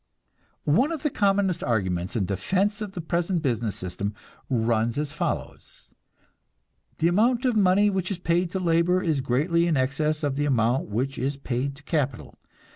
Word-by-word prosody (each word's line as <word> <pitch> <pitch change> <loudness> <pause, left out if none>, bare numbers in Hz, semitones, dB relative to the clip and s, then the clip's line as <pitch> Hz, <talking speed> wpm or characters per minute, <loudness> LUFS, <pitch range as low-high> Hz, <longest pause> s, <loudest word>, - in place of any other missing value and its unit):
One 250 - +3
of 320 -4 -4
the 300 - +1
commonest 195 -4 +1
arguments 95 -5 -1
in 105 -5 +1
defense 190 - 0
of 205 -2 -5
the 175 - -4
present 170 +1 -1
business 115 -6 -1
system 100 +3 -4 0.3
runs 115 -1 +1
as 150 -1 -2
follows: 150 - -5 1.1
The 165 - +2
amount 230 +8 +2
of 250 -3 +2
money 200 0 +4
which 190 -1 -1
is 195 - -2
paid 175 0 0
to 190 - 0
labor 175 +1 +2
is 155 -5 +1
greatly 155 +7 +1
in 160 -4 +2
excess 150 +4 0
of 140 -2 -1
the 145 - +1
amount 120 -3 +1
which 130 +6 -2
is 135 +3 -1
paid 135 +1 -2
to 140 - -17
capital. 140 -5 -2
150 Hz, 170 wpm, -25 LUFS, 125-185 Hz, 1.1 s, money